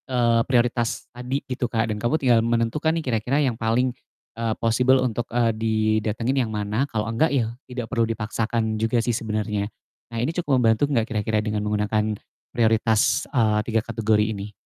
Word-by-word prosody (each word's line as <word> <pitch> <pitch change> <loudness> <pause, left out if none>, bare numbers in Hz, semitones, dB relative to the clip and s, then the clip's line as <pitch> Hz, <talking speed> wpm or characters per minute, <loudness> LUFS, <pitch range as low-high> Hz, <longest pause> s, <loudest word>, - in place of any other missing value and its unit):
Eee, 120 -2 +3
prioritas 120 -2 +1
tadi 125 +3 -4
gitu 125 -1 -3
Kak, 115 -2 0
dan - - -5
kamu 120 +8 +1
tinggal 125 -6 +3
menentukan 115 +6 0
nih 165 - -2
kira-kira 120 +2 0
yang 140 -5 +2
paling, 115 +3 0 0.4
eee, 115 -1 -1
possible, 125 +3 +3
untuk, 120 -2 -1
eee, 115 -1 +1
didatengin 110 +3 0
yang - - -7
mana, 105 +6 -1
kalau 105 -1 -2
enggak 115 +8 +1
ya, 115 -5 0 0.2
tidak 125 -2 -4
perlu 115 -3 +1
dipaksakan 110 0 -2
juga 115 +2 +1
sih 120 +1 +1
sebenernya. 105 -2 -2 0.4
Nah, 115 - -6
ini 125 +8 -1
cukup 150 -7 +1
membantu 115 +4 +3
gak 115 -5 +2
kira-kira 110 -1 0
dengan 105 -1 -1
menggunakan 105 0 0 0.3
prioritas, 110 -1 +2
eee, 110 -6 +2
3 115 -1 0
kategori 110 -2 +1
ini? 100 0 -6
115 Hz, 170 wpm, -23 LUFS, 110-125 Hz, 0.4 s, Eee